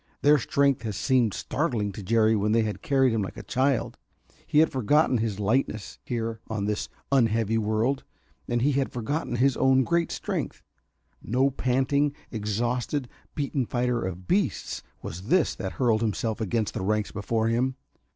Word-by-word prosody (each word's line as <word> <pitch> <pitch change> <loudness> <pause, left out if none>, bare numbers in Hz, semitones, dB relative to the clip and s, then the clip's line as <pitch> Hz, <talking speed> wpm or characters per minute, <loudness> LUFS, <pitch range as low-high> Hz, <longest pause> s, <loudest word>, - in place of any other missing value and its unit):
Their 145 0 +6
strength 140 +2 +2
had 110 -3 -4
seemed 125 -3 +2
startling 120 - -1
to 100 - -8
Jerry 110 +2 +3
when 105 +1 +1
they 115 0 +4
had 105 -1 -4
carried 135 -3 +3
him 110 - +1
like 95 - -5
a 110 - -7
child. 130 +4 0 0.5
He 150 - 0
had 160 +1 +5
forgotten 130 +1 +2
his 110 -3 -2
lightness 110 0 -1
here 115 -2 -3
on 110 -3 -2
this 105 0 -2 0.2
unheavy 115 -4 +2
world. 110 +5 0 0.4
And 120 0 0
he 145 - +3
had 135 -1 0
forgotten 125 +3 -2
his 130 +1 +3
own 130 0 +4
great 170 +3 +1
strength. - - -4 0.6
No 130 +4 +1
panting, 135 +3 +1 0.2
exhausted, 120 +5 -2 0.3
beaten 140 -4 -1
fighter 120 -1 0
of 90 -1 -5
beasts 180 - 0 0.2
was 90 +5 -7
this 175 +1 +3
that 95 - -5
hurled 115 -4 +2
himself 110 0 -1
against 110 +1 -1
the - - -3
ranks 105 +2 0
before 110 +2 -1
him. 125 +3 +1
120 Hz, 165 wpm, -26 LUFS, 110-135 Hz, 0.6 s, Their